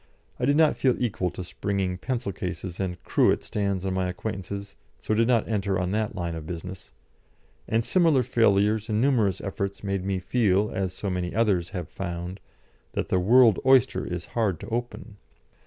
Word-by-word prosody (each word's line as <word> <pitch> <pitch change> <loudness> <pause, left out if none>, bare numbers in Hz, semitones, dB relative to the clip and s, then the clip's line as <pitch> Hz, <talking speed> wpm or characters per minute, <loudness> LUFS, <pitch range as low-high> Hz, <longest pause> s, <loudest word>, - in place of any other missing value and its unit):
I 125 - +1
did 140 +2 +3
not 155 -2 +4
feel 130 -2 +3
equal 100 -7 -1
to 90 - -7
springing 95 0 -2
pencil 120 -2 -2
cases 90 -1 -5
and 90 -2 -2
cruet - - +2
stands 100 -2 -2
on 95 - -1
my 95 -1 0
acquaintances, 100 +1 -5 0.2
so - - -2
did 115 +1 +3
not 120 -3 +2
enter 100 -3 0
on 90 0 -1
that 110 0 -1
line 85 -2 -3
of 80 -1 -7
business, 90 +2 -7 0.8
and 115 +1 +1
similar 165 -8 +4
failures 110 -2 +2
in 105 0 +1
numerous 115 -7 +2
efforts 100 0 -4
made 100 -2 -2
me 95 0 -1
feel, 105 0 +1
as 95 -1 -2
so 95 +1 -4
many 90 0 -3
others 100 -7 +2
have 90 -5 -5
found, 85 +2 -5 0.5
that - - -2
the 95 - +2
world 115 +2 +5
oyster 130 -3 +4
is 90 -1 -4
hard 105 -8 0
to - - -7
open. 120 -2 -5
100 Hz, 180 wpm, -26 LUFS, 90-115 Hz, 0.8 s, world